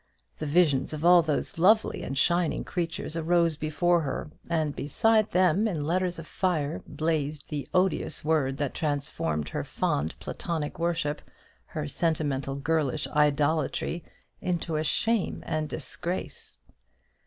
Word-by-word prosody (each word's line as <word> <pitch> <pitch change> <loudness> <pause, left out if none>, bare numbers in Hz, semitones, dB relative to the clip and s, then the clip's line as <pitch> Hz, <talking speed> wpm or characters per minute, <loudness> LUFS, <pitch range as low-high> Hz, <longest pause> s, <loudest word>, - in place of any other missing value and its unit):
The 155 - -3
visions 150 -3 +3
of 155 +2 -3
all 175 0 +8
those 155 0 -2
lovely 215 +5 +4
and 135 - -4
shining 170 +2 +2
creatures 165 -2 -3
arose 170 0 +2
before 165 +3 +1
her; 145 0 -4 0.2
and 155 -4 0
beside 215 - +2
them, 185 +4 +3
in 160 -8 -2
letters 180 +2 +1
of 165 - -7
fire, 165 -5 -1
blazed 155 -2 -2
the 145 -2 -4
odious 180 -5 0
word 145 -4 +1
that 145 -2 -2
transformed 140 - -2
her - - -3
fond 75 +3 -1
platonic 160 -3 -4
worship, 165 -3 0 0.5
her 75 - -4
sentimental 145 - 0
girlish 150 0 0
idolatry, 150 +3 +1 0.4
into 170 -2 -1
a 155 - +1
shame 225 +6 0
and 155 -1 -2
disgrace. 175 +4 -4
160 Hz, 130 wpm, -28 LUFS, 145-175 Hz, 0.5 s, all